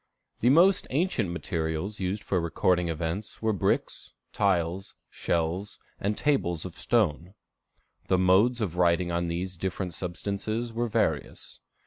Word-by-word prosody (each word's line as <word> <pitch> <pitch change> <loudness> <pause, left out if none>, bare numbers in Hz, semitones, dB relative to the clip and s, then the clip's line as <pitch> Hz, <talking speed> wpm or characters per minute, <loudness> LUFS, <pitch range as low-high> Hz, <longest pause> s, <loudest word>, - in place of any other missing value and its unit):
The 120 - +3
most 180 +7 +5
ancient 135 - 0
materials 85 +2 -3
used 95 +2 -2
for 95 - 0
recording 90 +1 +1
events 85 +5 -4
were 110 -1 +1
bricks, 100 - -1 0.2
tiles, 95 -2 0 0.2
shells, 85 +5 -2 0.2
and 105 +1 -1
tables 90 - 0
of 90 - -6
stone. 90 -5 0 0.7
The 95 - +3
modes 100 +7 +4
of 90 -5 -2
writing 85 0 +3
on 85 0 0
these 90 +2 -3
different 90 0 -3
substances 100 +6 -3
were 120 +1 -1
various. 105 -10 -2
95 Hz, 130 wpm, -27 LUFS, 85-110 Hz, 0.7 s, most